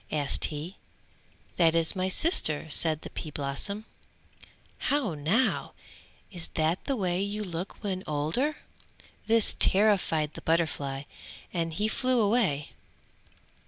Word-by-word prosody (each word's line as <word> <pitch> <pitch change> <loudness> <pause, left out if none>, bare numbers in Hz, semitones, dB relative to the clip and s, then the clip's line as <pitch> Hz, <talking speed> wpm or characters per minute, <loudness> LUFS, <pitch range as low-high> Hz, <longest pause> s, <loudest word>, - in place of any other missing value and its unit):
asked 145 -2 0
he. 155 +5 -5 0.8
"That 165 -2 +4
is 165 +2 +5
my 185 0 -1
sister," 185 - +2
said 155 0 +2
the - - -8
pea 155 - -6
blossom. 150 +9 -3 1.0
"How 275 - +1
now, 165 - 0 0.6
is 175 -4 -7
that 160 +3 0
the 275 - 0
way 185 -4 -1
you 205 +1 -2
look 180 +2 -6
when 190 -2 -3
older?" 160 - -1 0.7
This 225 -1 +5
terrified 190 -7 +3
the - - -8
butterfly 145 -5 -1 0.5
and 165 -2 -1
he 210 +6 0
flew 255 +3 +1
away. 200 -10 +1
175 Hz, 125 wpm, -28 LUFS, 155-210 Hz, 1.0 s, is